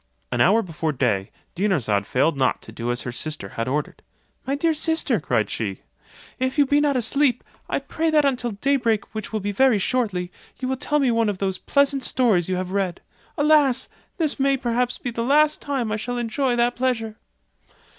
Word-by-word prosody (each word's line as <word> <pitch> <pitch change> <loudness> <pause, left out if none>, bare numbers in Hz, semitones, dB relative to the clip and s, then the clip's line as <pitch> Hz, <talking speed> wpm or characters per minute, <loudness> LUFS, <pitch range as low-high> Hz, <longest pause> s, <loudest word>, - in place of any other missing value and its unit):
An 120 - +1
hour 215 - +4
before 165 -2 -2
day, 110 -8 0 0.2
Dinarzade 140 - 0
failed 145 +5 +2
not 130 -2 +1
to - - -10
do 115 +2 -4
as 120 +1 -1
her 125 - -4
sister 120 -4 -5
had 115 +4 -4
ordered. 145 +3 -3 0.5
"My 275 - +1
dear 325 +3 +1
sister," 315 -5 0
cried 115 -8 0
she, 100 -4 -3 0.6
"if 260 +3 -1
you 290 - +5
be 285 +2 +3
not 285 -3 +2
asleep, 255 +1 +1 0.3
I - - 0
pray 325 0 -2
that 305 -2 +3
until 250 -4 0
daybreak, 235 -1 0
which 215 -1 -5
will 215 -1 -2
be 205 +1 -2
very 250 +2 +4
shortly, 195 -5 -1 0.3
you 255 - -3
will 265 - 0
tell 295 +2 0
me 270 -4 +2
one 230 -2 +2
of 200 - -3
those 190 -1 -2
pleasant 280 -1 +2
stories 220 -9 +2
you 185 - 0
have 185 0 -3
read. 195 -3 -1 0.4
Alas! 290 -4 +4 0.3
this 310 -4 +1
may 275 0 +3
perhaps 245 0 -1
be 245 - -4
the 230 - -3
last 300 +4 +3
time 270 -6 -2
that - - -1
I - - -1
shall 245 +3 -4
enjoy 240 +2 0
that 240 0 +1
pleasure." 225 -4 -1
230 Hz, 200 wpm, -23 LUFS, 180-270 Hz, 0.6 s, you